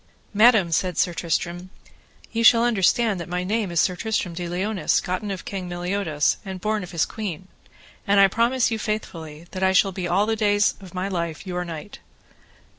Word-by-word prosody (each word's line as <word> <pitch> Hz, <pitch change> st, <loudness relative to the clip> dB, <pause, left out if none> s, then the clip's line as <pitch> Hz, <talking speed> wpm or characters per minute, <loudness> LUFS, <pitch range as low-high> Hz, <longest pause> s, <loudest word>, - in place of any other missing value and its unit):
Madam, 210 Hz, -5 st, +5 dB
said 180 Hz, +1 st, 0 dB
Sir 175 Hz, -, +2 dB
Tristram, 175 Hz, +2 st, -2 dB, 0.6 s
ye 230 Hz, -, -1 dB
shall 230 Hz, 0 st, +6 dB
understand 220 Hz, -1 st, +2 dB
that 170 Hz, -, -7 dB
my 180 Hz, +1 st, -2 dB
name 210 Hz, +1 st, -1 dB
is 170 Hz, -1 st, 0 dB
Sir 180 Hz, -, +2 dB
Tristram 205 Hz, -3 st, -2 dB
de 175 Hz, 0 st, -5 dB
Liones, 190 Hz, +3 st, 0 dB
gotten 185 Hz, +3 st, -3 dB
of 195 Hz, -2 st, -5 dB
King 185 Hz, -3 st, -5 dB
Meliodas, 175 Hz, -3 st, 0 dB
and 190 Hz, -2 st, -6 dB
born 215 Hz, +2 st, -1 dB
of 180 Hz, -, -8 dB
his 170 Hz, -3 st, 0 dB
queen. 190 Hz, -4 st, -6 dB, 0.6 s
And 200 Hz, 0 st, +4 dB
I 195 Hz, -, +8 dB
promise 235 Hz, +5 st, +1 dB
you 225 Hz, -, -1 dB
faithfully 165 Hz, -8 st, -5 dB
that 185 Hz, -, -6 dB
I 190 Hz, 0 st, +3 dB
shall 195 Hz, +1 st, +4 dB
be 180 Hz, -1 st, -4 dB
all 190 Hz, +4 st, +2 dB
the 225 Hz, +1 st, 0 dB
days 205 Hz, -1 st, +2 dB
of 185 Hz, -2 st, -12 dB
my 185 Hz, +1 st, -2 dB
life 170 Hz, -3 st, -4 dB
your 180 Hz, -1 st, -3 dB
knight. 170 Hz, +4 st, -8 dB
190 Hz, 190 wpm, -23 LUFS, 175-210 Hz, 0.6 s, I